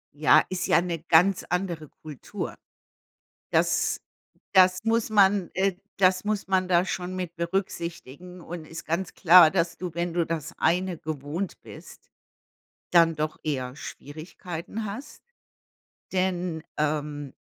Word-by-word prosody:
Ja, 155 +1 +5
ist 185 -1 -2
ja - - +5
'ne 175 -2 -3
ganz 170 +4 +3
andere 175 -4 -2
Kultur. 150 -4 -7 1.0
Das - - +1 0.5
das 185 -1 +5
muss 225 0 +1
man, 200 -3 +4
äh, 190 +1 +1 0.2
das 185 0 +3
muss 210 -2 -2
man 185 -1 +2
da 180 0 +3
schon 180 0 -4
mit 180 -2 -5
berücksichtigen. 170 -1 -4
Und 170 -1 -8
ist 165 +1 -8
ganz 175 +3 -2
klar, 175 -2 +7
dass 170 -1 0
du, 180 -3 -6
wenn 170 0 -2
du 170 -1 +2
das 165 -1 -4
eine 180 +2 +1
gewohnt 155 +5 -5
bist, - - -13 0.8
dann 165 -2 +5
doch 155 0 -3
eher 130 -3 -3
Schwierigkeiten 170 +8 -7
hast, 225 +8 -8 0.9
denn, 180 -3 -1
ähm, 150 -2 -2
175 Hz, 130 wpm, -26 LUFS, 160-185 Hz, 1.0 s, klar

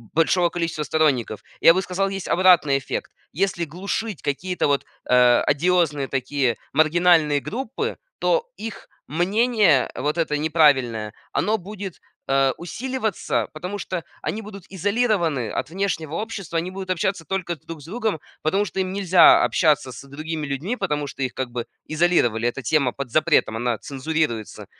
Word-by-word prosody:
большого 170 +2 +3
количества 165 -3 -2
сторонников. 140 -9 0 0.2
Я 165 - +8
бы 190 - +2
сказал, 190 +2 -1
есть 195 -1 -5
обратный 175 -7 +4
эффект. 135 - -5 0.2
Если 175 0 0
глушить 200 +6 -4
какие-то 180 +6 -1
вот, 140 -1 +1 0.2
а, 125 -1 +5
одиозные 150 -2 +2
такие 130 -2 0 0.2
маргинальные 155 -2 +4
группы, 265 - -4 0.2
то 485 -1 +1
их 225 -1 -7 0.2
мнение, 195 - +2
вот 150 +5 -1
это 160 -3 0
неправильное, 135 -9 +2 0.2
оно 215 +1 +1
будет, 195 -1 -8 0.3
э, 135 -1 +3
усиливаться, 225 +3 -2
потому 180 +6 -5
что 185 -3 -4 0.2
они 220 - -3
будут 200 -3 -10
изолированы 190 - 0
от - - -3
внешнего 165 -4 -2
общества, 200 -4 -4
они 175 +3 -2
будут 190 0 -7
общаться 185 0 -1
только 180 0 -3
друг 165 0 -10
с - - -13
другом, 215 -1 -2 0.2
потому 195 +7 +1
что 190 0 -5
им 185 0 -1
нельзя 185 -3 +6
общаться 150 -5 +2
с 140 - -10
другими 155 +2 -5
людьми, 145 - -2
потому 150 -10 -2
что 140 - -8
их 130 -2 -1
как 130 -2 -3
бы 120 -1 -4 0.2
изолировали. 155 -9 +2
Эта 130 +3 -3
тема 130 +1 +2
под 135 -3 -6
запретом, 155 -6 +2
она 120 0 -1
цензурируется 140 -5 -3
165 Hz, 150 wpm, -23 LUFS, 140-190 Hz, 0.3 s, Я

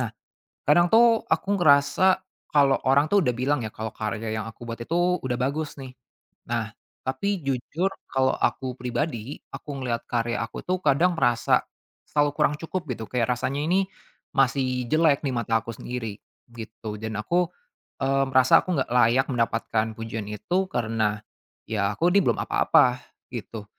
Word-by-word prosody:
Nah, - - -1 0.6
kadang 175 +4 +5
tuh 230 0 +6
aku 160 +4 0
ngerasa 150 +4 +4 0.3
kalau 140 -2 +5
orang 140 +2 +5
tuh 205 - +6
udah 125 - +1
bilang 130 +3 +1
ya - - -2
kalau 110 0 -5
karya 110 +1 -3
yang - - -4
aku 115 +1 -11
buat 115 - -5
itu 175 +7 +1
udah 125 -2 -2
bagus 145 +4 -2
nih. 130 -1 -8 0.6
Nah, 110 -2 -2 0.3
tapi 200 +10 -1
jujur 140 +8 -1 0.2
kalau 130 0 +2
aku 130 -1 -1
pribadi, 125 0 -3 0.2
aku 145 -2 -7
ngelihat 120 -2 -2
karya 120 -1 0
aku 115 - -6
tuh 185 +1 0
kadang 155 +5 +3
merasa 120 -3 +3 0.5
selalu 145 -1 +3
kurang 150 - +2
cukup 175 +2 -3
gitu 110 -1 -6
kayak 125 -1 +1
rasanya 130 +3 -2
ini 185 +4 +2 0.5
masih 130 -1 +2
jelek 155 -3 +3
di 135 - 0
mata 115 -1 +1
aku 115 - -5
sendiri 115 -4 -5 0.3
gitu 110 -2 -7
dan 110 -1 -4
aku, 175 +11 +1 0.5
mmm, 135 0 +2
merasa 130 -1 +6
aku 180 -2 -1
nggak 130 - -1
layak 125 +2 +4
mendapatkan 115 -2 0
pujian 115 -2 -5
itu 105 - -3
karena 110 -2 -1 0.5
ya 105 -2 0
aku 175 +8 +2
ini 200 - +5
belum - - +2
apa-apa 125 0 +3 0.3
gitu. 115 -2 -6
130 Hz, 160 wpm, -25 LUFS, 115-150 Hz, 0.6 s, tuh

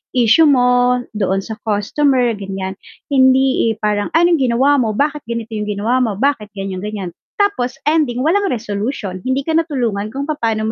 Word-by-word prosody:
issue 250 +7 +5
mo 250 -2 +3
doon 195 -2 -1
sa 220 +2 -7
customer 245 +4 +1
ganiyan," 190 -1 -5 0.4
hindi, 260 -3 +3
eh, - - -4
parang, 205 -1 0
"Ano 345 +2 +4
yung 330 -5 +2
ginawa 280 +3 +3
mo, 220 -4 0
bakit 295 +3 0
ganito 230 -1 -5
yung 210 -1 -3
ginawa 210 +5 0
mo, 230 -5 0
bakit 255 -1 0
ganiyan-ganiyan?" 195 0 -5 0.3
Tapos 405 -12 0
ending 295 -5 +1
walang 395 +5 +2
resolution, 210 -3 -4
hindi 260 +5 -2
ka 320 - -1
na 330 - +4
tulungan 220 -7 -2
kung 275 +5 -4
papaano 230 -8 -1
245 Hz, 170 wpm, -17 LUFS, 210-275 Hz, 0.4 s, issue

